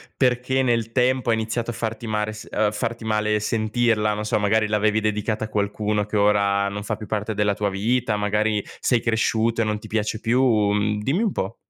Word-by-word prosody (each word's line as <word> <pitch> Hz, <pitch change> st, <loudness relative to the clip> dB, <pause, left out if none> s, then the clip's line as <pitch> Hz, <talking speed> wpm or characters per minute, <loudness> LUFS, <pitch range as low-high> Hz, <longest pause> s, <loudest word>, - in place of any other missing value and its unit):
perché 125 Hz, 0 st, +1 dB
nel 115 Hz, -3 st, 0 dB
tempo 125 Hz, 0 st, +2 dB
ha -, -, +4 dB
iniziato 110 Hz, +1 st, -2 dB
a -, -, -8 dB
farti 115 Hz, 0 st, -4 dB
mare 105 Hz, -1 st, -1 dB
s 105 Hz, -, -10 dB
uhm, 105 Hz, -1 st, +1 dB
farti 115 Hz, +2 st, -3 dB
male 105 Hz, -1 st, +1 dB
sentirla, 110 Hz, 0 st, +1 dB
non 105 Hz, +1 st, -4 dB
so, -, -, +1 dB
magari 110 Hz, +1 st, +2 dB
l'avevi 105 Hz, 0 st, +2 dB
dedicata 110 Hz, +1 st, -1 dB
a -, -, -9 dB
qualcuno 105 Hz, 0 st, -1 dB
che 105 Hz, +1 st, -2 dB
ora 100 Hz, -1 st, +2 dB
non 100 Hz, +1 st, -5 dB
fa -, -, -2 dB
più 110 Hz, -, -9 dB
parte 105 Hz, +2 st, -2 dB
della 105 Hz, -1 st, +1 dB
tua 105 Hz, 0 st, -1 dB
vita, 115 Hz, +3 st, 0 dB
magari 105 Hz, 0 st, 0 dB, 0.2 s
sei 120 Hz, -3 st, +2 dB
cresciuto 115 Hz, 0 st, +1 dB
e -, -, +3 dB
non 105 Hz, -1 st, -1 dB
ti -, -, -11 dB
piace 110 Hz, 0 st, -2 dB
più? 105 Hz, -4 st, +2 dB
Dimmi 150 Hz, -, 0 dB
un 215 Hz, -, +1 dB
po'. 95 Hz, -, -3 dB
110 Hz, 205 wpm, -23 LUFS, 105-115 Hz, 0.2 s, ha